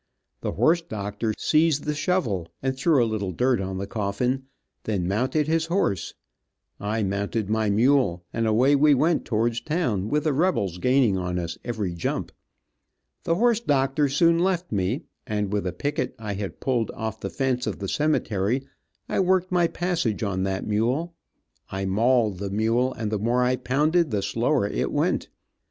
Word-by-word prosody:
The -, -, -3 dB
horse 160 Hz, -, +3 dB
doctor 110 Hz, -6 st, -3 dB
seized 155 Hz, -2 st, +2 dB
the 150 Hz, -, -1 dB
shovel 145 Hz, -, 0 dB, 0.2 s
and 130 Hz, 0 st, 0 dB
threw 135 Hz, -1 st, +3 dB
a -, -, +2 dB
little 105 Hz, -4 st, -2 dB
dirt 125 Hz, +5 st, +1 dB
on 95 Hz, 0 st, -4 dB
the 95 Hz, -, -3 dB
coffin, 115 Hz, +6 st, -2 dB, 0.4 s
then 95 Hz, -5 st, -1 dB
mounted 130 Hz, +9 st, 0 dB
his 165 Hz, 0 st, +1 dB
horse, 165 Hz, -, -1 dB, 0.6 s
I 105 Hz, +2 st, -1 dB
mounted 100 Hz, +2 st, -2 dB
my 110 Hz, -1 st, +1 dB
mule, 105 Hz, -5 st, +2 dB
and 115 Hz, -1 st, 0 dB
away 125 Hz, +6 st, +4 dB
we 145 Hz, +1 st, +5 dB
went 155 Hz, +5 st, +2 dB
towards 115 Hz, +1 st, 0 dB
town, 120 Hz, -, -1 dB
with 150 Hz, +3 st, +1 dB
the 155 Hz, -3 st, +1 dB
rebels 130 Hz, -, 0 dB
gaining 125 Hz, -4 st, +3 dB
on 90 Hz, 0 st, -2 dB
us 85 Hz, -1 st, -4 dB
every 110 Hz, -7 st, -3 dB
jump. 85 Hz, -, -3 dB, 0.9 s
The 165 Hz, -, +2 dB
horse 235 Hz, +3 st, +3 dB
doctor 140 Hz, -, +1 dB
soon 165 Hz, +4 st, +3 dB
left 180 Hz, -1 st, 0 dB
me, 100 Hz, +5 st, -1 dB, 0.2 s
and 105 Hz, -2 st, -2 dB
with 100 Hz, -2 st, 0 dB
a -, -, -1 dB
picket 135 Hz, +8 st, -2 dB
I 105 Hz, -2 st, -4 dB
had 100 Hz, -1 st, -5 dB
pulled 120 Hz, -4 st, 0 dB
off 110 Hz, -1 st, -4 dB
the -, -, -4 dB
fence 130 Hz, -2 st, -1 dB
of -, -, -2 dB
the 100 Hz, -, -5 dB
cemetery, 125 Hz, -4 st, 0 dB, 0.4 s
I -, -, -1 dB
worked 185 Hz, -1 st, +2 dB
my 175 Hz, -1 st, +3 dB
passage 170 Hz, -, -1 dB
on 95 Hz, -3 st, -1 dB
that 95 Hz, 0 st, -2 dB
mule. 125 Hz, +11 st, 0 dB, 0.6 s
I 95 Hz, 0 st, -3 dB
mauled 110 Hz, 0 st, +2 dB
the 100 Hz, 0 st, -3 dB
mule, 115 Hz, +5 st, +1 dB
and 110 Hz, -2 st, -4 dB
the 105 Hz, -, 0 dB
more 120 Hz, +4 st, +2 dB
I 125 Hz, +1 st, +2 dB
pounded 150 Hz, +6 st, +1 dB
the 105 Hz, -4 st, -1 dB
slower 115 Hz, +2 st, +1 dB
it -, -, -2 dB
went. -, -, 0 dB
120 Hz, 175 wpm, -25 LUFS, 100-150 Hz, 0.9 s, we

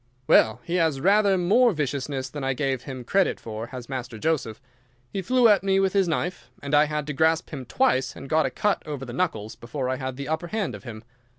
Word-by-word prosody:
"Well, 110 Hz, 0 st, +4 dB
he 175 Hz, +1 st, -1 dB
has 160 Hz, -5 st, +1 dB
rather 200 Hz, +4 st, +4 dB
more 215 Hz, +7 st, +4 dB
viciousness 140 Hz, -3 st, -2 dB
than 145 Hz, +2 st, -7 dB
I 135 Hz, 0 st, 0 dB
gave 135 Hz, -2 st, -2 dB
him 130 Hz, -2 st, -6 dB
credit 195 Hz, +9 st, +1 dB
for, 110 Hz, 0 st, -6 dB
has 125 Hz, -1 st, -8 dB
Master 125 Hz, -3 st, -5 dB
Joseph. 125 Hz, -4 st, -1 dB, 0.5 s
He 195 Hz, -, -1 dB
flew 245 Hz, +5 st, +4 dB
at 210 Hz, -2 st, +5 dB
me 195 Hz, 0 st, +2 dB
with 195 Hz, -1 st, +1 dB
his 195 Hz, -2 st, +3 dB
knife, 175 Hz, +2 st, -3 dB
and 140 Hz, +1 st, -6 dB
I 150 Hz, +1 st, +6 dB
had 150 Hz, -1 st, -3 dB
to 150 Hz, -, -4 dB
grasp 160 Hz, +3 st, +1 dB
him 135 Hz, -5 st, -6 dB
twice, 130 Hz, -, +1 dB
and -, -, -9 dB
got 155 Hz, +2 st, +2 dB
a -, -, -2 dB
cut 205 Hz, -1 st, 0 dB
over 145 Hz, -3 st, -5 dB
the 120 Hz, -, -8 dB
knuckles, 110 Hz, -, -2 dB
before 130 Hz, +2 st, -4 dB
I 130 Hz, -, -1 dB
had 130 Hz, -1 st, -4 dB
the 140 Hz, -1 st, -5 dB
upper 160 Hz, +2 st, -2 dB
hand 215 Hz, +2 st, -2 dB
of -, -, -10 dB
him. 110 Hz, -2 st, -8 dB
145 Hz, 230 wpm, -25 LUFS, 130-180 Hz, 0.5 s, I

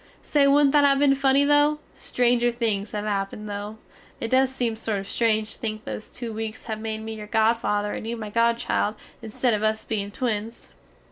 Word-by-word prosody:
Say 285 Hz, -2 st, +3 dB
woodnt 280 Hz, 0 st, +5 dB
that 295 Hz, 0 st, +5 dB
have 280 Hz, -1 st, +5 dB
been 280 Hz, -1 st, +4 dB
funny 275 Hz, +1 st, +3 dB
though! 290 Hz, +1 st, +4 dB, 0.2 s
Stranger 240 Hz, -1 st, +1 dB
things 220 Hz, -4 st, -1 dB
have 210 Hz, 0 st, -3 dB
happined 205 Hz, +1 st, -3 dB
though. 205 Hz, +1 st, -5 dB, 0.4 s
It 225 Hz, -, -4 dB
does 260 Hz, 0 st, +4 dB
seem 245 Hz, -4 st, -2 dB
sort 220 Hz, -2 st, -2 dB
of 195 Hz, 0 st, -6 dB
strange 220 Hz, -1 st, +1 dB
to -, -, -14 dB
think 215 Hz, -1 st, -4 dB
those 215 Hz, -, -6 dB
too 235 Hz, -2 st, -6 dB
weaks 220 Hz, 0 st, -5 dB
have 220 Hz, -2 st, -5 dB
made 220 Hz, 0 st, -4 dB
me 225 Hz, 0 st, -5 dB
your 210 Hz, -1 st, -8 dB
godfather 220 Hz, -2 st, +1 dB
and 220 Hz, -, -5 dB
you 235 Hz, +1 st, -3 dB
my 215 Hz, -2 st, -6 dB
godchild 230 Hz, -2 st, +1 dB, 0.3 s
insted 230 Hz, +2 st, 0 dB
of 210 Hz, -, 0 dB
us 220 Hz, 0 st, 0 dB
bein 200 Hz, -2 st, -2 dB
twins. 225 Hz, 0 st, -4 dB
225 Hz, 200 wpm, -24 LUFS, 215-250 Hz, 0.4 s, woodnt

